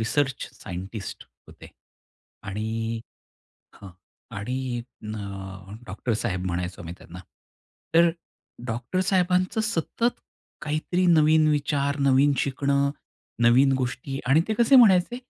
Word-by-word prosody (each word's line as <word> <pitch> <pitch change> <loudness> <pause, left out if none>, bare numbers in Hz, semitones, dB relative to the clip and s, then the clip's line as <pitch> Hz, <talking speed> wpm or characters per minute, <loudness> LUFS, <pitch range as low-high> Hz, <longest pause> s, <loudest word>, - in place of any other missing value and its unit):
Research 130 +4 0
scientist 95 +2 -7 0.2
होते - - -13 0.8
आणि 110 +3 -3 0.7
हां 100 -2 -12 0.5
आणि 125 +6 -3 0.5
अ, 100 -2 -7
डॉक्टर 110 +5 -3
साहेब 90 -4 -2
म्हणायचो 90 0 -3
आम्ही 85 +1 -7
त्यांना. 90 +2 -12 0.8
तर 170 0 +6 0.6
डॉक्टर 120 +10 -2
साहेबांचं 185 +2 +1
सतत 225 +3 -1 0.4
काहीतरी 155 +4 -1
नवीन 155 -1 +5
विचार, 145 -1 0
नवीन 140 +1 +4
शिकणं, 140 +1 +1 0.5
नवीन 130 +4 +5
गोष्टी 130 +2 -3
आणि 135 +5 +5
ते 220 - +1
कसे 240 +3 +6
म्हणायचे 215 -1 +5
135 Hz, 105 wpm, -25 LUFS, 105-160 Hz, 0.8 s, तर